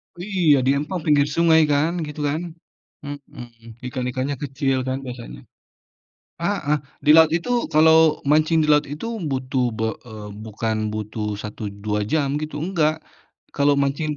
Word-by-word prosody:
Iya, 175 -4 +2
di 135 - +4
empang 160 +5 -3
pinggir 145 -2 +4
sungai, 165 -1 +5
kan, 145 +3 +2 0.2
gitu, 150 0 -7
kan? 155 +3 -2 0.6
Mmm, 120 -5 -10
ikan-ikannya 130 +2 -3
kecil, 135 -1 -1
kan, 130 0 -1
biasanya. 120 - -8 1.0
Heeh. 170 -5 0 0.3
Di 150 - +4
laut 160 -1 +7
itu 175 +8 -5 0.2
kalau 160 0 +5
mancing 155 +2 +3
di - - 0
laut 150 0 +3
itu, 150 +9 -5 0.2
butuh 130 -1 -1
be 110 - 0 0.2
eee, 105 -2 -9 0.2
bukan 110 +1 -2 0.2
butuh 105 0 -4
1 105 +1 -8 0.2
2 105 0 0
jam, 150 -3 +1
gitu, 155 -1 -5
enggak. 160 -4 +1 0.6
Kalau 145 0 +3
mancing 140 +3 -1
145 Hz, 145 wpm, -22 LUFS, 125-155 Hz, 1.0 s, laut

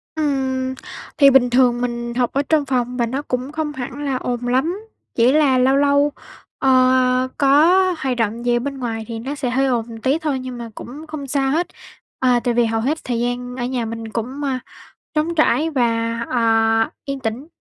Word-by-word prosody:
Ừm. 265 -4 -1 0.4
Thì 280 -1 +7
bình 255 -2 +5
thường 245 -1 +3
mình 235 -1 -3
học 245 0 +1
ở 280 - +2
trong 310 -3 +3
phòng, 250 -2 -1
và 235 - +2
nó 260 +5 -3
cũng 255 -1 -3
không 305 -1 -3
hẳn 265 +3 -6
là 270 - -1
ồn 245 -1 -3
lắm. 300 +11 0 0.4
Chỉ 240 +2 +4
là 290 -3 +4
lâu 260 +2 +3
lâu, 285 +1 +3 0.5
ờ, 270 - +2 0.5
à, - - -2
có 280 +2 +5 0.3
hoạt 265 -5 -2
động 230 +1 -1
gì 240 0 +3
ở - - +2
bên 275 +2 -4
ngoài 225 -3 -4
thì 230 -1 -5
nó 270 +6 -5
sẽ 265 -4 -2
hơi 270 +2 +1
ồn 230 -3 -2
tí 270 +6 +1
thôi, 300 -4 -1
nhưng 255 -1 -6
mà 235 -1 -7
cũng 290 +6 -9
không 305 -3 -6
sao 270 0 0
hết. 335 +4 0 0.5
À, 250 -2 +3
tại 245 - +1
vì 240 0 +3
hầu 225 0 -1
hết 290 +6 0
thời 240 -2 -2
gian 245 +1 -3
ở 245 - -3
nhà 245 -2 -2
mình 225 0 -6
cũng, 245 +6 -4
ơ, 265 -2 -1 0.6
trống 315 +2 0
trải 315 0 +2
và, 230 -4 0
ờ, 225 -1 +2
yên 275 -1 -4
tĩnh. 235 +4 -4
255 Hz, 210 wpm, -20 LUFS, 240-280 Hz, 0.6 s, Thì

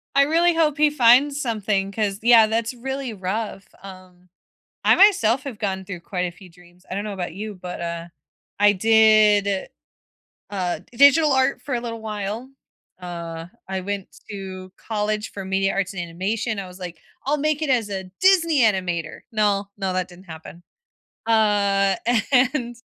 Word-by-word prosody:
I 280 - +6
really 335 +3 +2
hope 305 -3 +2
he 300 0 +4
finds 275 +1 +4
something, 205 -4 -1
'cause, 205 -1 -2
yeah, 230 -2 +7
that's 230 +2 -1
really 265 0 -5
rough, 195 +1 -4 0.2
um. 185 -2 -14 0.5
I - - +5
myself 275 - +4
have 255 -7 -7
gone 190 -2 -3
through 185 -3 -7
quite 180 +1 -5
a 175 - -4
few 180 +1 -16
dreams, 175 +1 -21
I - - -4
don't 200 - -3
know 210 -1 -5
about 180 -3 -5
you, 210 +1 -6
but, 180 -1 -7
uh, 170 0 -5 0.5
I 205 0 +5
did, 210 -2 +4 0.8
uh, 185 -3 -2
digital 285 +4 +5
art 265 -1 +1
for 270 -1 -5
a 235 - -2
little 230 -2 -6
while. 215 +3 -5 0.5
Uh, 170 -2 -7 0.2
I 190 0 -3
went 200 0 -5 0.2
to 190 -2 -8
college 215 0 -3
for 195 -2 -7
media 195 0 0
arts 195 0 -2
and 180 - -4
animation, 200 +6 -3
I 190 - -6
was 180 +1 -13
like, 175 -2 -8 0.3
"I'll 295 +2 +1
make 305 +1 0
it 305 - -1
as 230 -5 +1
a 190 -1 -4 0.2
Disney 335 -6 +4
animator!" 185 -7 0
No, 205 -2 0
no, 190 -2 -2
that 185 -1 -1
didn't 180 +2 -15
happen. 165 +1 -11 0.6
Uh, 200 -3 +2 0.4
and 250 -2 +2
205 Hz, 170 wpm, -22 LUFS, 185-240 Hz, 0.8 s, yeah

